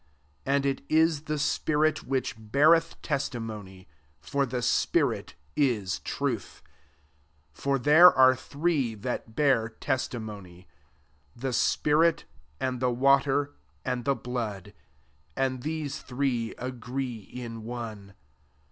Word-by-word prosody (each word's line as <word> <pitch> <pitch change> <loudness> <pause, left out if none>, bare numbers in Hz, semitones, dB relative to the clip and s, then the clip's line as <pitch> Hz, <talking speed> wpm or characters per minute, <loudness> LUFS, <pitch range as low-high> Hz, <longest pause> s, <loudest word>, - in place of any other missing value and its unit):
And 140 0 +2
it 135 -1 0
is 160 -1 +3
the 150 -1 -2
spirit 155 +1 +1
which 135 -1 -1
beareth 150 +10 +3
testimony; 110 - -4 0.3
for 140 -1 -1
the 125 0 -3
spirit - - +1 0.2
is 105 -9 +1
truth4 130 -7 -1
7 - - -17 0.9
For 140 - 0
there 150 +7 +8
are 130 0 +6
three 140 -3 -1
that 110 0 -5
bear 130 -6 +3
testimony, 105 -8 -4 0.7
8 - - -18
the 135 -1 -2
spirit, 155 +7 +2 0.3
and 130 -1 -2
the 125 0 +1
water, 140 +3 +2 0.3
atid 125 -2 -2
the 140 - +2
blood, 115 -5 -5 0.6
and 130 -1 -1
these 150 0 -3
three 125 -3 -2
agree 125 0 -4
in 115 +2 -8
one. 110 -4 -7
130 Hz, 115 wpm, -28 LUFS, 115-140 Hz, 0.9 s, there